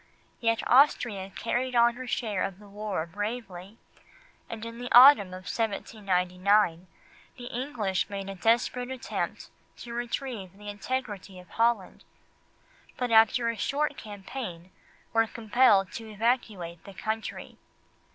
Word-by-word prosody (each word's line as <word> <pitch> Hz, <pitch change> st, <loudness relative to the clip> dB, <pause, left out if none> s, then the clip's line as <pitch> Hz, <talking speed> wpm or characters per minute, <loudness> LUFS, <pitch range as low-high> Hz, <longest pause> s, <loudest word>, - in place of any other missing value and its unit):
Yet 230 Hz, -1 st, +1 dB
Austria 240 Hz, -7 st, +3 dB
carried 250 Hz, +5 st, -2 dB
on 235 Hz, 0 st, +5 dB
her 255 Hz, +1 st, -8 dB
share 215 Hz, -6 st, -1 dB
of 195 Hz, -1 st, -2 dB
the 205 Hz, 0 st, -15 dB
war 200 Hz, -4 st, -3 dB
bravely, 205 Hz, +1 st, -6 dB, 0.7 s
and 225 Hz, 0 st, -6 dB
in 230 Hz, 0 st, -8 dB
the 245 Hz, 0 st, -6 dB
autumn 250 Hz, -4 st, +9 dB
of 185 Hz, 0 st, -9 dB
1799 190 Hz, -4 st, 0 dB, 0.5 s
the 245 Hz, -, -9 dB
English 240 Hz, -7 st, -2 dB
made 195 Hz, -1 st, -5 dB
a 195 Hz, -, -5 dB
desperate 240 Hz, +5 st, +1 dB
attempt 260 Hz, -1 st, -4 dB, 0.3 s
to 235 Hz, -, -8 dB
retrieve 235 Hz, -5 st, -4 dB
the 210 Hz, 0 st, -9 dB
integrity 205 Hz, -3 st, -4 dB
of 180 Hz, -, -15 dB
Holland, 230 Hz, -4 st, 0 dB, 0.9 s
but 250 Hz, -2 st, -2 dB
after 225 Hz, +1 st, +5 dB
a 230 Hz, -, -2 dB
short 290 Hz, +8 st, -1 dB
campaign 195 Hz, -4 st, -8 dB, 0.4 s
were 225 Hz, 0 st, +3 dB
compelled 220 Hz, -4 st, +3 dB
to 225 Hz, 0 st, -7 dB
evacuate 210 Hz, -6 st, -1 dB
the 200 Hz, -, -12 dB
country. 220 Hz, +2 st, -5 dB
220 Hz, 130 wpm, -28 LUFS, 195-240 Hz, 0.9 s, autumn